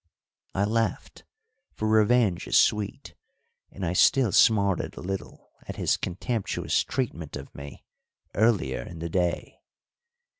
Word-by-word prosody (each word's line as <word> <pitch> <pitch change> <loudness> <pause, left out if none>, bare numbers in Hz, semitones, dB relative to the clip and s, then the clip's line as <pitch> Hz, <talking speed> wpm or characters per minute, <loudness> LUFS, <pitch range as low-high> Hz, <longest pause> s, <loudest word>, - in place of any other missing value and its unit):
I 95 - +2
laughed, 110 -1 -2 0.5
for 110 - -2
revenge 110 -3 +3
is - - +3
sweet, 105 -2 +1 0.6
and 95 - -6
I 85 - -1
still 120 +4 +4
smarted 100 -2 +3
a - - -7
little 95 +1 -6 0.2
at - - -6
his - - +1
contemptuous 105 +4 -2
treatment 85 - -4
of 70 -1 -9
me 70 -1 -10 0.5
earlier 100 - +1
in 85 - -9
the 85 +1 -5
day. 90 0 -2
95 Hz, 125 wpm, -26 LUFS, 85-110 Hz, 0.6 s, still